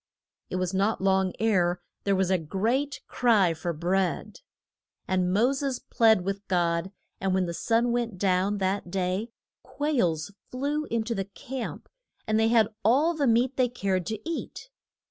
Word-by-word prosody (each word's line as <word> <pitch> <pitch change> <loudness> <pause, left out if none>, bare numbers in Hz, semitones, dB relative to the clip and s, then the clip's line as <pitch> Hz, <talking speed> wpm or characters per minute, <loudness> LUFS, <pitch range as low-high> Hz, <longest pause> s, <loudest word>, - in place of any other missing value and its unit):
It - - -4
was 185 0 -1
not 200 +3 +1
long 190 -1 +2
ere 180 -5 +2 0.3
there 200 -1 +3
was 190 0 +1
a 185 - +3
great 230 - -1
cry 215 -8 +3
for 165 +2 -3
bread. 180 - -1 0.7
And 185 -1 +1
Mo 230 +8 +3
ses 275 -2 -2
plead 220 -4 +3
with 195 +2 -4
God, 170 0 0 0.3
and 190 -1 0
when 190 -1 +2
the 170 - -4
sun 230 +6 +1
went 235 -4 -1
down 190 +2 +1
that 190 -1 -1
day 185 +4 -1 0.3
quails 200 - -1 0.2
flew 285 +4 -2
in 230 -4 -1
to 230 +1 -2
the 195 -3 -2
camp, 240 +6 -7 0.4
and 215 0 +1
they 220 - +4
had 225 -2 +4
all 280 - +4
the 295 -4 0
meat 240 +3 +2
they 255 -2 +3
cared 190 -7 -1
to 220 - -2
eat. 335 +8 -5
200 Hz, 165 wpm, -27 LUFS, 185-240 Hz, 0.7 s, they